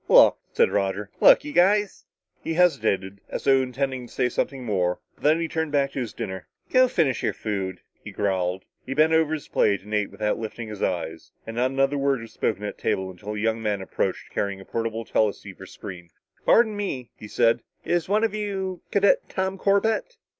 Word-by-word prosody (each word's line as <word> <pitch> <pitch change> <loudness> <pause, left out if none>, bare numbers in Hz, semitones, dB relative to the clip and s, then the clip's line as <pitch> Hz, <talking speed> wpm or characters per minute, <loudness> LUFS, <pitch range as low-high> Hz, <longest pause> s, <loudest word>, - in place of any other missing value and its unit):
"Look," - - +7
said - - +3
Roger. 100 +1 -1
"Look, - - +7
you 150 - -6
guys 195 +4 +3 0.2
" - - -43
He 165 - -2
hesitated, 100 - +1
as - - -4
though 135 -1 +5
intending 130 -1 -3
to - - -19
say 125 - +1
something 135 +1 -2
more, 90 -5 0 0.2
but - - -25
then 155 +2 +4
he 165 - -1
turned 160 -2 -2
back 140 -1 +2
to 140 - -4
his 120 -4 -3
dinner. 95 -1 -6 0.2
"Go 255 - +5
on 255 - +5
finish 140 - +1
your - - 0
food," 95 -4 -4 0.2
he - - -7
growled. 95 -2 -1 0.2
He 135 - -5
bent 155 +2 +4
over 160 -1 +3
his 150 - -8
plate 100 -2 +2
and 105 +1 -9
ate 105 -1 +1
without 105 0 -2
lifting 110 0 -6
his 105 -2 -8
eyes. 85 -3 -3
And 115 - -7
not 125 +2 +2
another 135 +1 +1
word 140 -1 +1
was 115 -1 -11
spoken 105 -1 -1
at 105 - -4
the - - -23
table 95 0 -1
until 100 +4 -7
a - - -3
young 110 +1 0
man 105 -2 0
approached, 95 - -3
carrying 100 -1 -2
a 95 - -12
portable 115 0 -3
teleceiver 105 -2 -1
screen. 85 -2 -9 0.4
"Pardon 225 -2 +5
me," 140 - -4
he 105 - -10
said. 115 +3 +2 0.2
"Is 175 +1 0
one 210 +2 +2
of 225 -2 +1
you 195 -3 -3
Cadet 200 0 +3
Tom 190 0 -2
Corbett?" 220 - +1
125 Hz, 210 wpm, -25 LUFS, 105-160 Hz, 0.4 s, Look